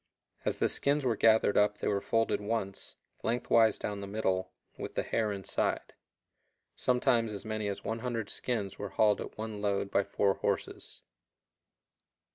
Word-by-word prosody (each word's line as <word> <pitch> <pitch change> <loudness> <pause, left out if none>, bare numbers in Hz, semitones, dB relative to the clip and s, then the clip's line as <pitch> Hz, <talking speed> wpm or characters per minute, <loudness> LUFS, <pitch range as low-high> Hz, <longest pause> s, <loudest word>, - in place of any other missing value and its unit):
As - - 0
the - - +2
skins 140 0 +1
were 120 -3 +2
gathered 110 -1 +4
up 105 0 +3
they - - -3
were 100 -1 +1
folded 115 0 +1
once, 100 -2 -3 0.3
lengthwise 115 -2 +3
down 100 -1 -4
the 100 - -5
middle, 95 -3 -1 0.2
with - - -7
the - - 0
hair 110 -2 0
inside. 100 -2 -2 0.8
Sometimes 125 -3 +2
as 100 0 -6
many 110 -1 -2
as 100 - -4
100 115 -1 -2
skins 105 -6 -2
were 100 - -4
hauled 105 +2 +3
at - - -8
one 110 -1 -5
load 100 -1 0
by 100 - +3
four 100 0 +1
horses. - - -3
105 Hz, 155 wpm, -31 LUFS, 100-115 Hz, 0.8 s, gathered